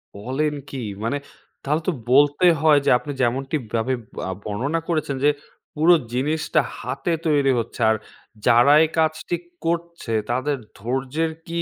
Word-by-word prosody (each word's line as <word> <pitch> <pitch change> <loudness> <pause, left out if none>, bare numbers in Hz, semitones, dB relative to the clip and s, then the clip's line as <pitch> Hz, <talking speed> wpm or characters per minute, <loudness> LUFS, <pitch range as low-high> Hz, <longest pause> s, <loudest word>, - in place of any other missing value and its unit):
বলেন 130 +9 -1 0.2
কি? 130 -3 -5 0.2
মানে 115 +5 0 0.5
তাহলে 150 +3 0
তো - - +3 0.2
বলতে 145 +5 +5 0.2
হয় 155 -2 +6
যে - - +3
আপনি 145 +3 -7
যেমনটিভাবে 130 -1 -1 0.3
আ - - -2
বর্ণনা 130 +11 -1
করেছেন 155 -4 0
যে - - +7 0.5
পুরো 160 +4 +5 0.2
জিনিসটা 150 +4 +1 0.2
হাতে 135 +5 -3 0.2
তৈরি 145 -3 +3
হচ্ছে। 115 +1 -5
আর 110 - +3 0.5
যারা 120 +5 +6
এই 160 - +1
কাজটি 160 +2 0 0.3
করছে 170 -6 -2 0.2
তাদের 135 +4 0 0.2
ধৈর্যের 135 +8 -2 0.2
কি 170 0 -2
145 Hz, 140 wpm, -22 LUFS, 125-160 Hz, 0.5 s, যে